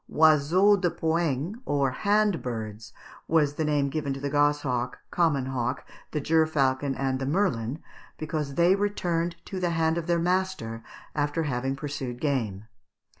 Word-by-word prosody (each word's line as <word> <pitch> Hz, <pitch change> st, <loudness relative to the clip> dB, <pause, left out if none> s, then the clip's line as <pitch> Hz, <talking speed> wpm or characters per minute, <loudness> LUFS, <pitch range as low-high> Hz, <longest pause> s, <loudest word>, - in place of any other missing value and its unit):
Oiseaux 160 Hz, +6 st, +5 dB
de 180 Hz, -2 st, +1 dB
poing, 165 Hz, -, -1 dB
or 140 Hz, -, +1 dB
hand 205 Hz, +3 st, +2 dB
birds, 110 Hz, -1 st, -5 dB, 0.4 s
was 150 Hz, -3 st, +3 dB
the 160 Hz, -, -2 dB
name 145 Hz, -2 st, +1 dB
given 145 Hz, -2 st, -2 dB
to -, -, -6 dB
the 140 Hz, 0 st, -3 dB
gosshawk, 145 Hz, -4 st, +1 dB
common 155 Hz, -7 st, +2 dB
hawk, 125 Hz, -2 st, -2 dB, 0.2 s
the 150 Hz, -, -2 dB
gerfalcon, 145 Hz, -3 st, +2 dB
and 135 Hz, -1 st, -1 dB
the 135 Hz, -, -2 dB
merlin, 145 Hz, -, 0 dB, 0.4 s
because 155 Hz, -3 st, -3 dB
they 175 Hz, +2 st, +5 dB
returned 175 Hz, -4 st, -1 dB
to 190 Hz, -, -5 dB
the 180 Hz, -1 st, 0 dB
hand 165 Hz, 0 st, +1 dB
of 165 Hz, -, -7 dB
their 170 Hz, -1 st, +2 dB
master 180 Hz, -10 st, -1 dB, 0.3 s
after 145 Hz, +2 st, 0 dB
having 135 Hz, -1 st, -1 dB
pursued 135 Hz, -4 st, -5 dB
game. 115 Hz, -9 st, -1 dB
150 Hz, 150 wpm, -27 LUFS, 135-170 Hz, 0.4 s, Oiseaux